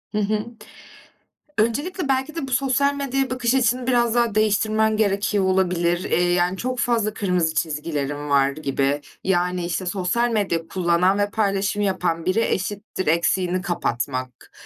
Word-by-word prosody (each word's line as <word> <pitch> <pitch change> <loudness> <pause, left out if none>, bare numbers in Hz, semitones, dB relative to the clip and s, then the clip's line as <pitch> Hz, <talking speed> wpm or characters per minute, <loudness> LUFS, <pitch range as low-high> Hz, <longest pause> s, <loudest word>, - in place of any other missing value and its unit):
Hı - - +2
hı. 210 +1 0 1.1
Öncelikle, 290 - 0
belki 270 +3 0
de 300 -5 -4
bu - - -7
sosyal 275 +2 +2
medyaya 270 -2 -1
bakış 250 -1 0
açını 250 -1 +1
biraz 240 -2 +2
daha 235 -3 +2
değiştirmen 215 +1 +2
gerekiyor 205 -1 +1
olabilir. 180 -2 +1
Eee, 175 0 +2
yani 180 +1 +1
çok 255 +4 -3
fazla 230 -3 +1
kırmızı 180 -6 0
çizgilerin 145 -2 -2
var 140 -1 +4
gibi. 140 -1 -1 0.2
Yani, 180 -1 0
işte, 180 +1 -3
sosyal 200 +6 0
medya 180 -7 -1
kullanan 180 +1 +2
ve 205 0 +1
paylaşım 200 -1 0
yapan 180 -4 -1
biri 185 +5 +2
eşittir 200 -2 -2
eksiğini 180 +3 +1
kapatmak, 130 -7 -3
195 Hz, 145 wpm, -22 LUFS, 175-235 Hz, 1.1 s, var